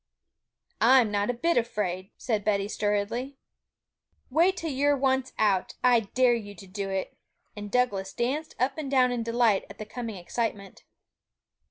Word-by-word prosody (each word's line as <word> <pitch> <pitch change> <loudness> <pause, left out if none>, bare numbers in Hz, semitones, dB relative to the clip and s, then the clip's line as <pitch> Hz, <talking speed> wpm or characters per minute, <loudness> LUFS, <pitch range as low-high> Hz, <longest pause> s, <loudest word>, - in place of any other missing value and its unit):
'I'm 240 -2 +6
not 205 +1 0
a - - +2
bit 335 +8 +1
afraid,' 195 -5 -1
said 215 -4 -1
Betty 200 -1 +1
sturdily. 210 +3 -1
'You 275 +1 -12 1.0
wait 370 +3 +4
till 325 -3 -3
you're 285 +2 +2
once 265 -1 +1
out. 200 -4 +1
I 250 -2 +6
dare 245 +3 +2
you 205 -3 -5
to 200 - -12
do 195 +1 -5
it!' 190 -1 -3 0.4
And 205 0 -7
Douglas 205 -5 0
danced 285 +7 -2
up 265 +5 0
and 290 -3 -4
down 255 -2 +4
in 245 -1 -1
delight 230 -3 +2
at - - -11
the 215 - -6
coming 230 0 -6
excitement. 200 +2 -4
230 Hz, 165 wpm, -27 LUFS, 205-255 Hz, 1.0 s, I'm